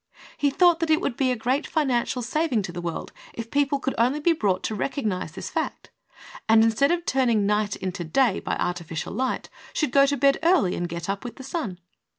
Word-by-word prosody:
He 290 Hz, -, +1 dB
thought 345 Hz, +3 st, +4 dB
that 330 Hz, -, -1 dB
it 310 Hz, 0 st, +4 dB
would 245 Hz, -, -2 dB
be 265 Hz, 0 st, +1 dB
a -, -, +1 dB
great 255 Hz, +6 st, -1 dB
financial 255 Hz, -5 st, 0 dB
saving 255 Hz, -2 st, 0 dB
to 180 Hz, -, -5 dB
the 175 Hz, 0 st, -6 dB
world 170 Hz, -1 st, -5 dB, 0.2 s
if 230 Hz, 0 st, -6 dB
people 280 Hz, 0 st, +2 dB
could 270 Hz, -1 st, -2 dB
only 255 Hz, +6 st, +2 dB
be 335 Hz, +3 st, +3 dB
brought 195 Hz, -, 0 dB
to -, -, -2 dB
recognize 210 Hz, -, -2 dB
this 190 Hz, -, -7 dB
fact, -, -, -4 dB, 0.6 s
and 220 Hz, 0 st, +7 dB
instead 225 Hz, +5 st, +3 dB
of 345 Hz, 0 st, -1 dB
turning 235 Hz, -6 st, +2 dB
night 210 Hz, 0 st, +1 dB
into 185 Hz, -2 st, -4 dB
day 205 Hz, +6 st, +2 dB
by -, -, -2 dB
artificial 170 Hz, -2 st, -3 dB
light, 255 Hz, +4 st, -2 dB, 0.2 s
should 300 Hz, -5 st, 0 dB
go 275 Hz, +1 st, +5 dB
to 285 Hz, 0 st, 0 dB
bed 275 Hz, +1 st, +3 dB
early 330 Hz, -, +3 dB
and 175 Hz, 0 st, -3 dB
get 170 Hz, 0 st, -5 dB
up 195 Hz, 0 st, -3 dB
with 245 Hz, -, -7 dB
the 265 Hz, -, -10 dB
sun. 270 Hz, -, -4 dB
245 Hz, 215 wpm, -25 LUFS, 195-280 Hz, 0.6 s, and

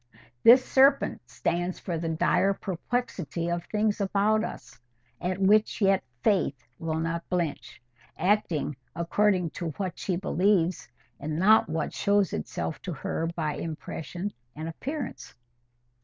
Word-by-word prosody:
This 255 Hz, -, +8 dB
serpent 275 Hz, +1 st, +4 dB
stands 175 Hz, +2 st, -1 dB
for 175 Hz, -, -4 dB
the 165 Hz, 0 st, -2 dB
dire 190 Hz, +4 st, +2 dB
perplexity 180 Hz, -, -3 dB
of 170 Hz, 0 st, -1 dB
things 210 Hz, -1 st, 0 dB
about 205 Hz, +2 st, +2 dB
us, 120 Hz, -, -8 dB, 0.4 s
at 180 Hz, +1 st, -1 dB
which 210 Hz, +4 st, +3 dB
yet 195 Hz, -2 st, +3 dB, 0.2 s
Faith 185 Hz, -9 st, +2 dB, 0.2 s
will 160 Hz, -1 st, -2 dB
not 165 Hz, +1 st, -3 dB
blench, 175 Hz, -5 st, -2 dB, 0.4 s
acting 175 Hz, -6 st, +1 dB, 0.2 s
according 180 Hz, +1 st, +1 dB
to 170 Hz, -, -4 dB
what 185 Hz, -4 st, -3 dB
she 185 Hz, -, -1 dB
believes, 180 Hz, -, +1 dB, 0.3 s
and 155 Hz, +1 st, -3 dB
not 210 Hz, +3 st, +5 dB
what 160 Hz, -1 st, -2 dB
shows 200 Hz, -3 st, +2 dB
itself 80 Hz, +1 st, -4 dB
to 180 Hz, -, -4 dB
her 160 Hz, +3 st, -2 dB
by 155 Hz, -3 st, -2 dB
impression 165 Hz, +4 st, -5 dB, 0.2 s
and 155 Hz, +2 st, -5 dB
appearance." 265 Hz, -, -5 dB
180 Hz, 130 wpm, -27 LUFS, 165-205 Hz, 0.4 s, This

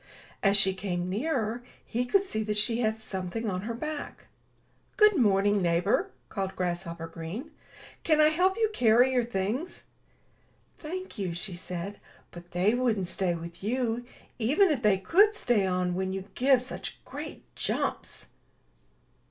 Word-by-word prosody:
As 200 Hz, 0 st, +4 dB
she 195 Hz, -1 st, +4 dB
came 180 Hz, -2 st, -3 dB
nearer, 235 Hz, -1 st, -1 dB, 0.2 s
he 245 Hz, +2 st, -1 dB
could 390 Hz, +9 st, +3 dB
see 220 Hz, -, -2 dB
that 210 Hz, -1 st, -1 dB
she 225 Hz, +2 st, +2 dB
had 220 Hz, -2 st, +1 dB
something 205 Hz, +1 st, -4 dB
on 185 Hz, -2 st, -1 dB
her 230 Hz, +3 st, -4 dB
back. 305 Hz, +4 st, -6 dB, 0.7 s
'*Good 425 Hz, -2 st, +6 dB
morning, 205 Hz, -, +3 dB
neighbor," 180 Hz, -, +2 dB, 0.2 s
called 195 Hz, -2 st, -3 dB
Grasshopper 175 Hz, -2 st, -3 dB
Green. 165 Hz, -, -7 dB, 0.5 s
''Can 310 Hz, -2 st, +3 dB
I 305 Hz, 0 st, +7 dB
help 370 Hz, +5 st, +2 dB
you 440 Hz, -1 st, +2 dB
carry 245 Hz, -, +5 dB
your 250 Hz, -2 st, +2 dB
things?'* 235 Hz, -, -3 dB, 1.0 s
'*Thank 370 Hz, -, -6 dB
you," 180 Hz, -4 st, -2 dB
she 180 Hz, +2 st, -6 dB
said, 180 Hz, +3 st, -5 dB, 0.3 s
''but 175 Hz, 0 st, -11 dB
they 185 Hz, +5 st, +2 dB
wouldn't 225 Hz, -7 st, +1 dB
stay 180 Hz, -3 st, +1 dB
with 170 Hz, +2 st, -9 dB
you, 240 Hz, +1 st, 0 dB, 0.4 s
even 300 Hz, -, +4 dB
if 275 Hz, -5 st, 0 dB
they 210 Hz, -4 st, +4 dB
could 400 Hz, -, +4 dB
stay 225 Hz, -, +2 dB
on 180 Hz, -1 st, 0 dB
when 190 Hz, +1 st, -2 dB
you 190 Hz, 0 st, -4 dB
give 260 Hz, -1 st, +4 dB
such 255 Hz, -, -6 dB
great -, -, -7 dB
jumps." -, -, -2 dB
215 Hz, 150 wpm, -28 LUFS, 185-255 Hz, 1.0 s, I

